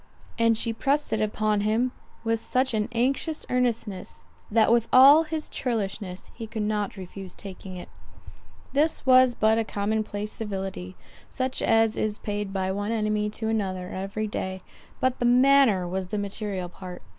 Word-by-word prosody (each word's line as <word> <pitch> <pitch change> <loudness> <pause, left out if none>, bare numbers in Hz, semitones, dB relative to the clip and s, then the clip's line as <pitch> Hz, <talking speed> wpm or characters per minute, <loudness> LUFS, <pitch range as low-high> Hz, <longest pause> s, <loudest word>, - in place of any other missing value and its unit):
And 230 -1 +4
she 230 0 -1
pressed 280 +6 0
it 220 - 0
upon 215 0 0
him 225 +4 +1 0.3
with 225 0 0
such 255 +2 0
an 215 -1 0
anxious 270 +7 0
earnestness, 230 -6 -2 0.3
that 225 +1 +4
with 235 -1 +3
all 280 +5 +8
his 310 -1 -3
churlishness 200 -6 -4
he 225 -1 -7
could 220 -1 -3
not 210 -1 -2
refuse 190 0 -8
taking 190 -1 -8
it. 175 - -8 0.9
This 300 +1 +1
was 255 -1 +6
but 220 +1 +3
a - - +1
common 215 +1 -1
place 210 0 -5
civility, 190 - -5 0.3
such 255 0 -3
as 225 -1 +3
is 215 -1 -1
paid 205 -1 -4
by 190 -1 -1
one 205 +2 -2
enemy 210 -1 0
to 220 +1 -4
another 190 -4 -2
every 195 +3 -3
day; 190 -3 -4 0.4
but 260 0 0
the 245 - 0
manner 250 -6 +5
was 185 +1 -3
the 210 - -3
material 200 -2 -3
part. 180 0 -10
215 Hz, 165 wpm, -26 LUFS, 195-240 Hz, 0.9 s, all